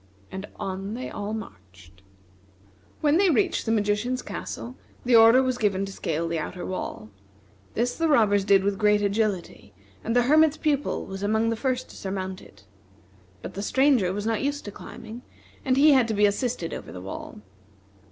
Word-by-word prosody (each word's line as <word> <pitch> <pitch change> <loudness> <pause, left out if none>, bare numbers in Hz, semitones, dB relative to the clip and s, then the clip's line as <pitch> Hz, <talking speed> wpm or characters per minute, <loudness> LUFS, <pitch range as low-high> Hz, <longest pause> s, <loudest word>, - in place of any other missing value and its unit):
And 190 +2 -6
on 195 +2 -5
they 255 - -6
all 205 +1 -5
marched. 95 - -10 1.0
When 300 +1 +3
they 385 0 +4
reached 250 -5 +1
the - - +2
magician's 220 +4 0
castle, 245 +2 -6 0.3
the 245 -1 +4
order 230 +3 +7
was 255 -1 -1
given 195 -2 +1
to 195 - -8
scale 165 -3 -2
the 165 -1 -2
outer 175 +4 -5
wall. 110 - -5 0.6
This 245 +2 0
the 330 - 0
robbers 215 -9 +4
did 195 -1 +4
with 200 0 -1
great 210 -1 +3
agility, 200 - -2 0.3
and 230 - -2
the 245 - +5
Hermit's 310 +3 +4
Pupil 290 -2 -1
was 195 0 -7
among 220 +2 +1
the - - 0
first 255 +1 -2
to - - -14
surmount 190 -1 -5
it. 100 -1 -18 0.8
But - - -7
the 200 - -5
Stranger 260 -4 +3
was 205 +2 -4
not 225 -1 0
used 285 +1 -2
to 205 - -6
climbing, 225 +3 -10 0.4
and 260 -1 +1
he 300 +2 +7
had 260 -4 +4
to 220 - -1
be 205 +1 +4
assisted 205 -4 -1
over - - -7
the 90 - -8
wall. 95 +2 -8
210 Hz, 180 wpm, -25 LUFS, 195-250 Hz, 1.0 s, order